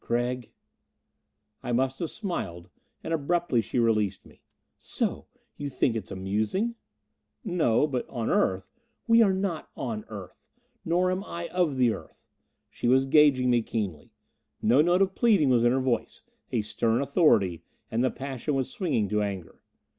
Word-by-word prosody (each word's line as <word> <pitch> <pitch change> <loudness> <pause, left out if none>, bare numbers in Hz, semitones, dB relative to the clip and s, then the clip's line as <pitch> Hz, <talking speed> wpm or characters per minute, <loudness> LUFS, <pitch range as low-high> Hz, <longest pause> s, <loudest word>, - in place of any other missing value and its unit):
"Gregg 120 +1 -1 0.6
" - - -52 0.3
I - - -4
must 130 +2 0
have 170 - -2
smiled. 95 - -5 0.3
And 165 - -3
abruptly 165 -4 +1
she 110 - -5
released 105 -5 +1
me. - - -19 0.4
"So - - -3 0.3
you 145 - -4
think 130 -2 0
it 110 -4 -4
amusing?" 105 - -1 0.7
"No. 160 - +2
But 130 -5 -3
on 115 -3 -3
Earth 95 0 +1 0.2
" 235 - -47
"We 230 0 +6
are 205 -4 +5
not 190 -4 -2
on 115 -4 -3
the - - -21
Earth. 100 -5 -10 0.3
Nor 180 +2 +1
am 185 +2 -2
I 170 -2 -6
of 175 -7 0
the 125 -3 +3
Earth!" 80 - -12 0.5
She - - -3
was 130 +2 +4
gauging 135 -3 +4
me 120 -1 +3
keenly. 100 -9 -4 0.5
No 120 +6 +4
note 175 +4 +4
of 190 0 -2
pleading 200 - +3
was 120 -2 +4
in 120 - +4
her 130 - +2
voice; 120 -4 -2 0.3
a 115 -3 0
stern 110 +2 0
authority; 115 - +3 0.3
and 115 +2 +1
the 130 - +3
passion 135 +2 -4
was 135 - -1
swinging 175 - 0
to 105 0 +1
anger. 95 -4 -5
130 Hz, 170 wpm, -27 LUFS, 110-165 Hz, 0.7 s, We